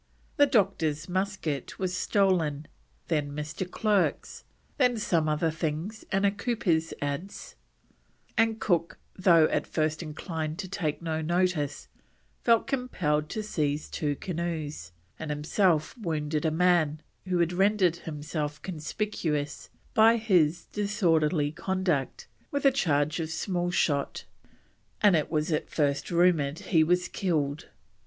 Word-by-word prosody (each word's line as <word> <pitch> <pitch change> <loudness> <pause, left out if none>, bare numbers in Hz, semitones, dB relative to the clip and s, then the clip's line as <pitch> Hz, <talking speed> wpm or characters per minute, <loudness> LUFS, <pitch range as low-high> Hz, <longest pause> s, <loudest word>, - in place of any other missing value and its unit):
The 285 - +6
doctor's 190 - +1
musket 185 -7 -2
was 185 -1 -2
stolen, 175 -8 +1 0.4
then 145 -2 -1
Mr. 150 +5 -4
Clerke's, 205 -1 0 0.4
then 250 -3 +3
some 165 -7 +1
other 155 +2 +1
things 165 +7 -3
and 195 0 +2
a 200 - +4
cooper's 200 -7 0
adze; 145 +8 -5 0.8
and 225 0 +2
Cook, 170 -3 0 0.2
though 170 -4 +5
at - - -1
first 155 0 -1
inclined 160 0 -4
to 195 -1 -5
take 170 -4 -3
no 160 -1 -1
notice, 170 -3 0 0.6
felt 230 -2 +4
compelled 170 - -1
to 215 - -3
seize 150 -7 -1
two 145 -2 -1
canoes, 155 - -4 0.3
and 160 - -5
himself 155 +2 +1
wounded 155 - -2
a - - +4
man, 160 -2 +2 0.2
who 180 -1 +1
had 170 0 +1
rendered 190 -2 +3
himself 150 -1 -4
conspicuous 155 -3 -3 0.2
by 225 +1 +6
his 180 -8 +2
disorderly 165 -7 +1
conduct, 175 -4 -1 0.2
with 285 0 -2
a 275 - +7
charge 150 - +1
of 160 -1 -2
small 175 +1 -1
shot, 145 -5 0 0.7
and 205 -4 +5
it 155 - 0
was 155 +1 0
at 155 - -1
first 145 -2 0
rumoured 170 -4 +3
he 165 -3 +2
was 180 +2 +2
killed. 155 -6 -2
165 Hz, 130 wpm, -28 LUFS, 150-190 Hz, 0.8 s, a